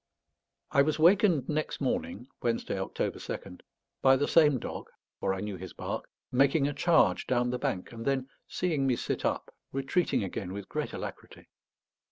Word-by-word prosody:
I 140 - +5
was 150 +1 +1
wakened 170 - +5
next 155 0 -2
morning 250 - -2
(Wednesday, 115 -4 -1
October 95 - -2
2nd) 90 -2 -7 0.4
by 135 0 +6
the 145 +2 +1
same 150 -5 +5
dog - - -6 0.3
for - - 0
I 95 0 -2
knew 105 -2 -4
his 95 0 -8
bark - - -5 0.2
making 140 +3 +4
a 145 - -2
charge 160 +3 +3
down 125 -1 +1
the 125 - -2
bank, 90 - -2
and 115 -1 -7
then, 135 0 0 0.2
seeing 155 -7 0
me 130 - +3
sit - - -3
up, - - -1 0.2
retreating 135 - +1
again 95 -1 -4
with 100 0 -6
great - - -3
alacrity. - - -8
135 Hz, 170 wpm, -30 LUFS, 115-155 Hz, 0.4 s, by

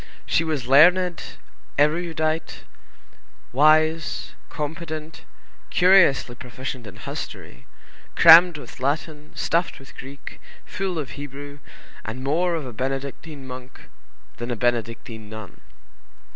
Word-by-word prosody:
She 165 - +1
was 155 -6 -2
learned, 175 +6 +5 0.6
erudite, 160 +1 0 0.9
wise, 155 +3 +2 0.2
competent, 155 +1 -6 0.4
curiously 180 -9 +4
proficient 125 0 -7
in 100 - -11
history, 65 - -8 0.5
crammed 170 0 +8
with 145 - -11
Latin, 150 +2 -3
stuffed 170 +1 0
with 135 - -15
Greek, 135 +1 -10 0.2
full 190 -3 -4
of 150 -4 -4
Hebrew, 145 0 -9 0.4
and 115 +4 -6
more 170 +5 +1
of 155 -4 -4
a 125 - -8
Benedictine 135 +4 -5
monk 125 0 -11 0.5
than 120 +1 -5
a 120 - -1
Benedictine 115 -1 -3
nun. 110 -3 -10
145 Hz, 105 wpm, -23 LUFS, 125-160 Hz, 0.9 s, crammed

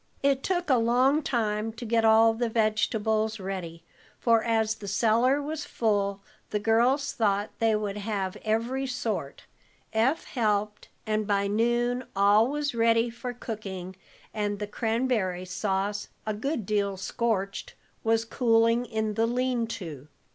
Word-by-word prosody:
It 275 -1 +3
took 355 +1 -1
a 255 - +5
long 255 +6 +3
time 220 -5 -1
to 235 +2 -8
get 225 0 +2
all 225 0 +6
the 235 +1 -1
vegetables 220 0 +1
ready, 180 -4 -6 0.4
for, 230 -2 +3
as 225 -2 +1
the 210 -2 -10
cellar 230 +7 +3
was 300 +1 -4
full, 200 -3 0 0.3
the 210 - -1
girls 240 +7 +2
thought 205 -2 0
they 225 -1 +3
would 210 -1 -2
have 200 -3 -3
every 235 +5 -1
sort. 255 +1 -3 0.5
Eph 245 +8 +2
helped, 210 -3 -1 0.2
and 215 -1 -1
by 200 -1 +1
noon 240 +4 +1
all 205 +3 +5
was 290 0 -2
ready 230 0 +3
for 240 +1 -5
cooking, 195 -6 -6 0.4
and 205 -1 -1
the 210 - -3
cranberry 220 -4 -1
sauce, 195 +2 -2 0.2
a 215 - -1
good 235 +1 -3
deal 200 -1 0
scorched, 195 0 -2 0.3
was 225 0 +2
cooling 230 0 +2
in 220 -2 -2
the 225 +2 +1
lean 245 -1 0
to. 160 - -7
225 Hz, 145 wpm, -27 LUFS, 205-240 Hz, 0.5 s, all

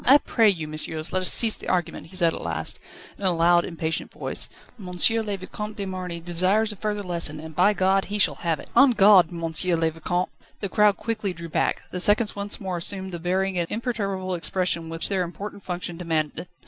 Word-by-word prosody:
"I 275 +3 +8
pray 230 -6 +3
you, 165 -6 -2
messieurs, 155 +1 -5
let 185 - +1
us 185 - +4
cease 225 -2 +7
the - - -7
argument," 180 -3 -2
he 185 - -13
said 170 -3 +3
at - - -6
last, 80 -1 -2 0.4
in - - -8
a 190 - +6
loud, 175 +1 +4
impatient 160 -1 -3
voice. - - -5 0.3
"M. 190 - -9
le 205 +3 +2
Vicomte 210 +3 -7
de 200 - -3
Marny 185 -2 -5
desires 185 +6 +1
a - - -6
further 210 0 -3
lesson, 170 -4 -1
and, 160 0 -10
by 200 +4 +4
God! 190 0 +2
he 210 - -3
shall 205 - +3
have 165 -3 -1
it. - - -12
En 275 -3 +6
garde, 195 -4 +6
M. 170 -1 -6
le 165 0 +1
Vicomte!" 175 +3 -2 0.3
The 200 - -3
crowd 210 0 +3
quickly 215 -4 -3
drew 170 -1 -8
back. - - -1
The 180 - -4
seconds 205 +3 +3
once 205 +1 -2
more 185 -3 -4
assumed 190 +2 -2
the 175 - -5
bearing 185 +2 -1
and 170 - -2
imperturbable 200 -5 -3
expression 175 -1 -1
which 165 0 -2
their 195 -2 0
important 195 +4 -6
function 175 -2 -5
demanded. 165 -1 -2
185 Hz, 210 wpm, -24 LUFS, 170-200 Hz, 0.4 s, I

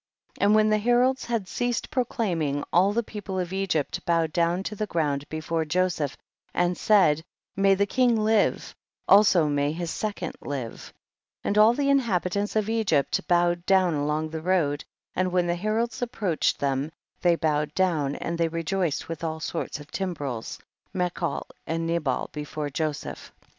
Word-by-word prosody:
29. - - -2
And 210 - +5
when 215 0 +4
the 215 - +3
heralds 245 +4 +2
had 230 -5 -2
ceased 245 +3 -2
proclaiming, 175 - -1
all 185 +4 +5
the 235 +3 0
people 205 -3 -6
of 180 0 -2
Egypt 190 -7 -1
bowed 165 -2 +1
down 170 +2 +1
to 210 - -4
the 215 +1 -2
ground 145 -5 -1
before 155 +1 -2
Joseph 160 -3 0 0.4
and 175 0 +2
said, 170 -8 +4 0.3
may 195 0 +4
the 200 +1 +2
king 245 +2 +2
live, 215 -1 +1 0.3
also 195 -5 +6
may 145 0 +1
his 170 +1 -4
second 200 -6 -3
live; 130 -5 -6 0.5
and 205 - 0
all 215 +3 +6
the 280 +1 0
inhabitants 205 -6 0
of 215 -1 +1
Egypt 215 -11 +1
bow 175 0 +4
ed 175 0 -6
down 190 -3 +4
along 150 +2 -1
the 160 -1 -4
road, 160 -5 +1 0.3
and 185 0 0
when 180 -1 +2
the 175 - +1
heralds 220 +6 -1
approached 210 -9 0
them, 140 +2 -1 0.3
they 175 -1 +4
bowed 150 -2 0
down, 155 -7 +1
and 170 0 -4
they 165 - +3
rejoiced 165 0 -1
with 165 -1 -6
all 160 -1 -2
sorts 165 -1 -4
of 145 +1 -13
timbrels, 145 - -4 0.4
mechol 180 -1 -1 0.2
and 165 +1 -1
ne 170 +1 +1
bal 135 -5 -1
before 150 0 -4
Joseph. 155 +1 -4
175 Hz, 170 wpm, -26 LUFS, 155-205 Hz, 0.5 s, also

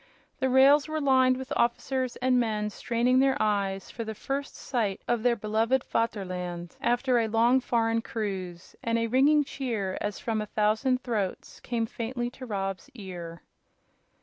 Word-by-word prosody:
The 260 - +1
rails 275 +3 +6
were 310 0 -2
lined 260 -3 +4
with 260 -1 -5
officers 255 +1 0
and 255 0 +2
men 210 -3 -1
straining 240 +4 +1
their 270 +1 +3
eyes 200 -2 0
for 230 - -5
the 220 -1 -5
first 275 +5 -4
sight 220 -7 -2
of 240 -2 +1
their 240 0 +3
beloved 225 +4 +1
"VATERLAND" 180 -6 -3
after 245 +1 +2
a 225 - +1
long 230 +4 +4
foreign 230 -2 +1
cruise, 190 -6 -5
and 230 0 0
a 230 - +1
ringing 280 +6 +4
cheer, 235 -9 -3
as 205 -1 -2
from 220 -2 -1
a 210 - -5
thousand 220 +5 +1
throats, 210 -6 -3
came 235 -2 -2
faintly 240 +2 -4
to 255 0 -10
Rob's 195 -3 -3
ear. 175 -5 -8
230 Hz, 160 wpm, -28 LUFS, 210-255 Hz, -, rails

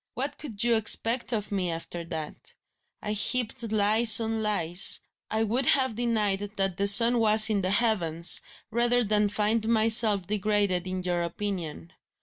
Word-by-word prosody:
What 280 +3 -5
could 230 -7 -5
you 240 0 +1
expect 230 +3 0
of 210 -3 -4
me, 190 -3 -3
after 170 +1 -6
that? 160 -2 -8 0.5
I 210 - -4
heaped 230 +1 -3
lies 215 +1 +5
on 225 -1 -4
lies 190 -4 +2 0.3
I 220 +1 -1
would 240 +4 -2
have 260 -4 +1
denied 215 -4 -2 0.2
that 195 -2 -2
the 200 - -1
sun 230 +4 +6
was 220 0 +4
in 205 -2 -1
the 185 - -3
heavens 175 -7 +1 0.3
rather 240 +2 0
than 210 -1 0
find 215 +2 -2
myself 220 -3 +2
degraded 205 -2 -2
in 185 0 -5
your 175 -1 -2
opinion. 170 - -7
210 Hz, 155 wpm, -25 LUFS, 195-230 Hz, 0.5 s, sun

